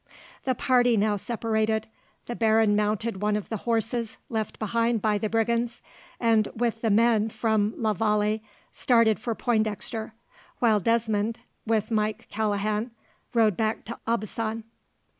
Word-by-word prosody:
The 260 -1 +1
party 245 -1 +3
now 210 0 +2
separated. 220 0 -1 0.4
The 240 - -5
baron 220 -2 +3
mounted 210 0 -1
one 210 0 +1
of 210 - -6
the 220 - -2
horses 230 0 0
left 220 -3 -3
behind 230 +1 0
by 210 0 +1
the 215 - -1
brigands, 230 +1 0 0.4
and 225 -2 +3
with 230 -1 -1
the 225 - +1
men 220 0 +3
from 220 -1 0
la 220 -2 +1
Vallee 210 +1 +1 0.3
started 230 -3 +3
for 230 0 -3
Pointdexter; 220 0 -1 0.4
while 220 -3 +3
Desmond, 225 0 0 0.3
with 220 0 0
Mike 215 -1 -1
Callaghan, 210 +1 -1 0.5
rode 220 -4 +4
back 215 +2 -1
to 235 +3 -7
Aubusson. 225 0 -2
220 Hz, 140 wpm, -26 LUFS, 215-230 Hz, 0.5 s, rode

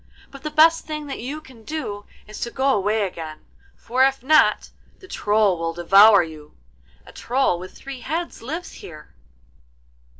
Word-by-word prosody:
But 275 - -12
the 305 - -4
best 320 +2 +4
thing 305 -1 -5
that 280 - -6
you 275 +6 -5
can 255 -6 -17
do 215 -9 -6 0.2
is 215 - -10
to 235 - -3
go 265 +2 +1
away 210 +1 0
again, 160 -4 -8 0.3
for 250 +3 0
if 270 -1 +1
not 310 +3 +3 0.3
the 375 - -16
Troll 210 - +1
will 165 0 -2
devour 195 +4 +6
you. 155 -2 -12 0.5
A - - -14
Troll 245 -8 0
with 185 +1 -10
three 275 -1 -9
heads 330 +7 -5
lives 320 +9 -6
here. 155 -3 -13
235 Hz, 165 wpm, -22 LUFS, 195-290 Hz, 0.5 s, devour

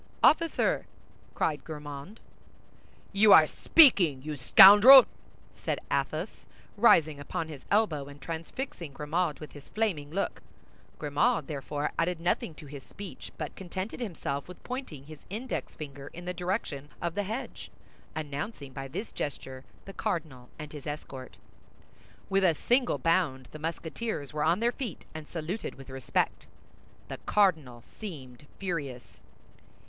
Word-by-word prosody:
"Officer!" 330 +1 +3 0.5
cried 150 -2 0
Grimaud. 150 +5 -8 0.9
"You 200 +1 +7
are 160 - +9
speaking, 175 - +5
you 155 0 -4
scoundrel!" 205 - +10 0.5
said - - -3
Athos, - - -2 0.3
rising 160 -9 +4
upon 160 +3 -4
his 145 -4 -10
elbow, 200 -10 +2
and 145 0 -12
transfixing 165 - -6
Grimaud 155 +3 -1
with 155 - -9
his 145 -1 -13
flaming 190 -10 -1
look. 195 +6 -3 0.6
Grimaud 155 +11 +1
therefore 145 -1 -3
added 170 0 0
nothing 170 -1 -1
to 155 - -12
his 140 -1 -9
speech, 200 +7 -10
but - - -5
contented 190 +4 -6
himself 160 - -4
with 180 -1 -12
pointing 250 - -6
his 155 +1 -12
index 230 +6 -5
finger 140 -2 -8
in 175 +1 -9
the 180 - -3
direction 175 -6 -3
of 170 -1 -2
the 205 - -1
hedge, 220 +6 -6 0.5
announcing 145 0 -5
by 135 0 -6
this 180 - -6
gesture 135 -2 -6 0.2
the 195 - -9
cardinal 140 -10 -4
and 150 0 -8
his 150 0 -8
escort. 135 -3 -7 0.9
With 195 0 +2
a 170 -4 +4
single 245 - +2
bound 165 -7 0
the 155 - -9
Musketeers 160 - -4
were 150 -1 -1
on 170 +6 +2
their 235 +1 +3
feet, 245 - -6
and 155 -1 -8
saluted 170 +6 -5
with 135 0 -12
respect. 130 -1 -1 0.6
The - - -6
cardinal 155 - +2 0.2
seemed 145 - -9
furious. 145 -10 -5
160 Hz, 140 wpm, -29 LUFS, 145-195 Hz, 0.9 s, scoundrel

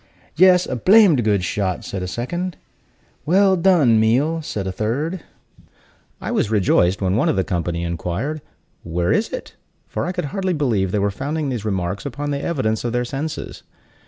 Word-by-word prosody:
"Yes, 180 +2 +5
a - - -3
blamed 185 - +5
good 100 -3 +1
shot!" 95 0 -2
said 95 - -4
a 90 - -3
second. 175 - -4 0.7
"Well 190 +3 +4
done, 165 -11 +4
Meal!" 135 +9 +2
said 105 -11 -4
a 95 - -2
third. 140 - -2 1.0
I - - -4
was - - 0
rejoiced 95 -2 +2
when 95 0 +1
one 115 - +2
of - - +1
the 95 - +1
company 85 -2 -2
inquired, 90 - -3 0.4
"Where 85 +1 -1
is - - +1
it?" - - -7 0.3
for - - -3
I - - -1
could 180 -3 -3
hardly 190 -2 -1
believe 115 - 0
they 105 - 0
were 100 0 +1
founding 145 +7 -3
these 120 -5 -4
remarks 95 -1 -2
upon 145 +2 -4
the 140 0 -2
evidence 130 -11 -1
of 120 -1 -2
their 125 0 0
senses. 140 +5 -5
120 Hz, 180 wpm, -21 LUFS, 95-160 Hz, 1.0 s, Yes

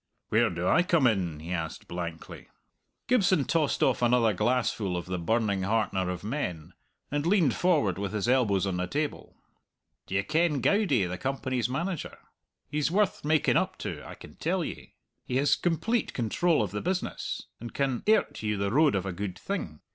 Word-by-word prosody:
"Where 115 +1 +3
do 85 +1 -3
I 170 - +5
come 170 -5 +2
in?" 90 -9 +1
he 85 +3 -7
asked 80 -3 -4
blankly. 85 -2 -6 0.6
Gibson 195 - +3
tossed 155 +1 +1
off 130 - +2
another 120 -2 +4
glassful 105 -3 0
of 85 - -4
the 90 -1 -3
burning 100 +2 +1
heartener 95 -2 0
of 90 0 -4
men, 90 - -4 0.4
and 145 0 0
leaned 170 - +3
forward 145 - +2
with 100 -1 -2
his 105 0 -1
elbows 115 -7 +3
on 95 -2 -1
the 90 0 -1
table. 150 +8 -3 0.7
"D'ye 95 +1 0
ken 155 0 +1
Goudie, 170 - +2
the 90 +1 -5
Company's 130 -2 -1
manager? 170 +6 -3 0.5
He's 150 +1 0
worth 200 +3 +1
making 155 0 +3
up - - -1
to, - - -4
I - - -9
can - - -14
tell - - 0
ye. - - -8 0.3
He 125 - -4
has 140 +2 +4
complete 210 +7 0
control 130 +5 +2
of 100 - -4
the 105 - -3
business, 185 +1 -3 0.2
and 120 +1 -7
can 135 -3 -1
airt 220 - +2
you 105 -1 -1
the 100 0 -1
road 145 0 +4
of 95 -1 -1
a 95 - -3
good 95 0 -4
thing. 125 - -5
120 Hz, 180 wpm, -28 LUFS, 95-150 Hz, 0.7 s, I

